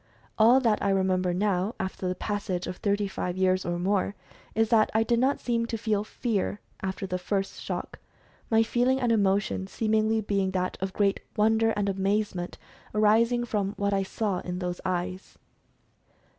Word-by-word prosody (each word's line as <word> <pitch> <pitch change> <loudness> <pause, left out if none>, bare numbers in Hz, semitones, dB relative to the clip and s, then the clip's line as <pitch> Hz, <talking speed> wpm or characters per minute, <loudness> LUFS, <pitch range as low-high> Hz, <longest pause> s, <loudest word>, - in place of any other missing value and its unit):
All 235 +4 +7
that 225 -4 +2
I 200 - +1
remember 185 -2 +2
now, 190 +2 0
after 190 0 -3
the 180 - -1
passage 200 -2 -3
of 180 - -5
thirty 205 0 0
five 180 -1 -4
years 185 0 +2
or 175 0 -1
more, 195 +2 0 0.4
is 225 0 +2
that 220 -2 +4
I 220 - +4
did 235 0 +1
not 265 +3 +2
seem 230 -1 0
to 230 - -3
feel 210 -2 0
fear 215 -2 -2 0.2
after 190 +1 -3
the 185 -1 -3
first 195 +1 -2
shock, - - -5 0.5
my 225 0 +4
feeling 250 +3 +2
and 245 -3 +1
emotion 200 -2 +1
seemingly 220 +1 +1
being 200 -2 0
that 185 0 -1
of 190 0 -2
great 200 -1 +2 0.2
wonder, 220 +1 +3
and 205 -1 0
amazement 195 -2 -1 0.4
arising 230 +3 +3
from 205 -4 -1
what 200 0 0
I 195 - +2
saw 195 -1 -2
in 180 0 -5
those 180 -1 -4
eyes. 185 0 -3
200 Hz, 170 wpm, -27 LUFS, 190-220 Hz, 0.5 s, All